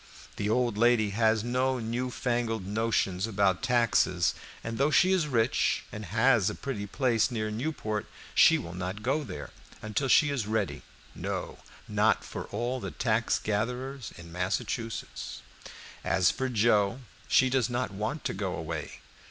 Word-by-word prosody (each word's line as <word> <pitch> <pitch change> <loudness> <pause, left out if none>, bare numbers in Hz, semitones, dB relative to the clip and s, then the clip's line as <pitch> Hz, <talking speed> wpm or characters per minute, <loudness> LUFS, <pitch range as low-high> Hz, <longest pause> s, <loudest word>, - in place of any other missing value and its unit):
The 105 - -1
old 120 -2 +1
lady 115 -3 +4
has 110 0 +2
no 130 +2 +1
new 120 +2 -2
fangled 120 -5 -1
notions 105 -2 0
about 100 -4 +1
taxes, 115 -9 +2 0.3
and 115 +1 -4
though 140 +2 +4
she 185 +4 +4
is 180 -5 +2
rich 120 -3 +1
and 105 0 -6
has 110 +1 +3
a - - -5
pretty 105 -7 -4
place 120 0 +2
near 110 -3 -2
Newport, 110 -4 -3 0.3
she - - +7
will 85 0 -6
not 90 +4 -5
go 140 +5 +1
there - - -7 0.3
until 110 +6 -2
she 145 +3 +5
is 125 -7 -2
ready, 110 -2 -1 0.3
no, - - -4 0.3
not - - +2
for - - -6
all 120 +4 -2
the - - -4
tax 115 -1 +1
gatherers 125 +3 -3
in 85 0 -11
Massachusetts. 105 +6 -3 0.6
As 95 -1 +3
for 130 0 -2
Joe, 110 0 +2 0.3
she 130 -1 +4
does 125 -3 +2
not 120 -3 -1
want 110 +9 -3
to - - -1
go 95 -2 -3
away. 80 -2 -5
115 Hz, 155 wpm, -29 LUFS, 100-125 Hz, 0.6 s, she